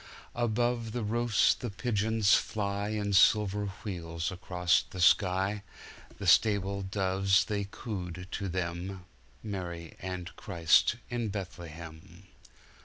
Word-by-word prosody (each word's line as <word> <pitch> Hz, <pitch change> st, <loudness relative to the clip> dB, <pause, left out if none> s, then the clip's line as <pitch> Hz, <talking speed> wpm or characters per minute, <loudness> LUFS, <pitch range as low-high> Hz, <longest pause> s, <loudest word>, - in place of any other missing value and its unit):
Above 120 Hz, -1 st, 0 dB
the 120 Hz, -2 st, -2 dB
roofs 115 Hz, 0 st, +3 dB
the 120 Hz, -, -5 dB
pigeons 110 Hz, 0 st, 0 dB
flyIn 100 Hz, 0 st, 0 dB
silver 105 Hz, +1 st, +4 dB, 0.2 s
wheels 85 Hz, -3 st, -4 dB
across 90 Hz, -2 st, +1 dB
the 90 Hz, +1 st, -10 dB
sky. 95 Hz, +3 st, +3 dB, 0.6 s
The -, -, -6 dB
stable 100 Hz, -2 st, +3 dB
doves 95 Hz, 0 st, +2 dB
they 100 Hz, -2 st, -2 dB
cooed 90 Hz, -5 st, -6 dB
to 100 Hz, -2 st, -3 dB
them, 90 Hz, +1 st, -4 dB, 0.4 s
Mary 90 Hz, -5 st, -6 dB
and 90 Hz, -1 st, -5 dB
Christ 85 Hz, +5 st, +3 dB, 0.2 s
in 120 Hz, -2 st, -1 dB
Bethlehem. 85 Hz, -2 st, -8 dB
95 Hz, 105 wpm, -30 LUFS, 90-105 Hz, 0.6 s, silver